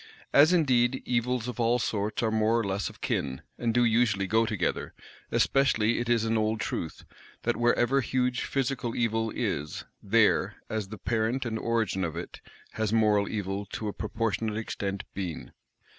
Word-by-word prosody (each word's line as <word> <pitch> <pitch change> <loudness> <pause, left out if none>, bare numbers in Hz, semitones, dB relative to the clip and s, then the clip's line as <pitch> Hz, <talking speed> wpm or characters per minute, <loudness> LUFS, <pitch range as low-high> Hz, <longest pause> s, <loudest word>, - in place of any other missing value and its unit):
As 150 +4 +7
indeed, 130 -7 +3
evils 125 0 0
of 125 -2 -5
all 120 +1 +3
sorts 110 -1 -1
are 110 - +1
more 110 +1 +2
or - - 0
less 100 0 -2
of - - -16
kin, 65 -1 -2 0.2
and 120 -1 +1
do 120 +1 +3
usually 110 -4 +2
go 110 +3 +2
together: 100 -6 -2 0.4
especially 120 -5 +2
it 120 0 -3
is 115 -2 +3
an 110 0 +1
old 110 0 0
truth, 85 -4 -4 0.4
that 120 - +1
wherever 120 +3 +2
huge 125 -1 0
physical 125 -3 -1
evil 115 -1 0
is, 75 +1 -2 0.2
there, - - +3 0.2
as 110 -2 -2
the 110 +2 -8
parent 120 +4 -1
and 110 -2 -2
origin 110 -5 0
of 85 -2 -3
it, 85 - -7 0.3
has 110 -1 -1
moral 105 -2 +3
evil 100 -1 -3
to 110 - -3
a - - -5
proportionate 110 -1 -2
extent 100 -3 -3
been. 90 -5 -5
110 Hz, 170 wpm, -28 LUFS, 105-120 Hz, 0.4 s, As